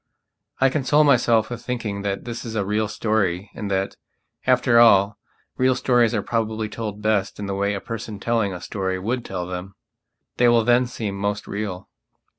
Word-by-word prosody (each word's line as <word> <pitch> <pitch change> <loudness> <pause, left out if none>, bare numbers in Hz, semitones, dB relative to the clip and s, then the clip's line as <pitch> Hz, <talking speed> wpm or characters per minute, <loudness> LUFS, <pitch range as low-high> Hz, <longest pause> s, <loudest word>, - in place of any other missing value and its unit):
I 135 - +5
console 145 +2 +3
myself 120 -5 +3
with 120 - -5
thinking 115 -5 -3
that 100 -1 -3
this 115 -1 -5
is 115 -2 -6
a 100 -3 0
real 105 +2 0
story 100 -3 -1
and 105 -2 -5
that, 95 0 -1 0.5
after 120 -1 +4
all, 100 -3 +5 0.4
real 130 0 +3
stories 120 -3 +2
are 105 - -1
probably 110 -1 -2
told 105 -2 -6
best 105 -2 +1
in 105 - -4
the 100 - -3
way 100 +1 0
a - - -3
person 110 -1 -6
telling 115 -2 0
a 90 -2 -7
story 95 -2 -3
would 115 +6 -2
tell 90 -4 -4
them. 90 +2 -6 0.6
They 120 - +4
will 120 -1 +5
then 120 +2 +3
seem 110 -4 -4
most 100 +1 -2
real. 100 -2 -5
110 Hz, 185 wpm, -23 LUFS, 100-120 Hz, 0.6 s, I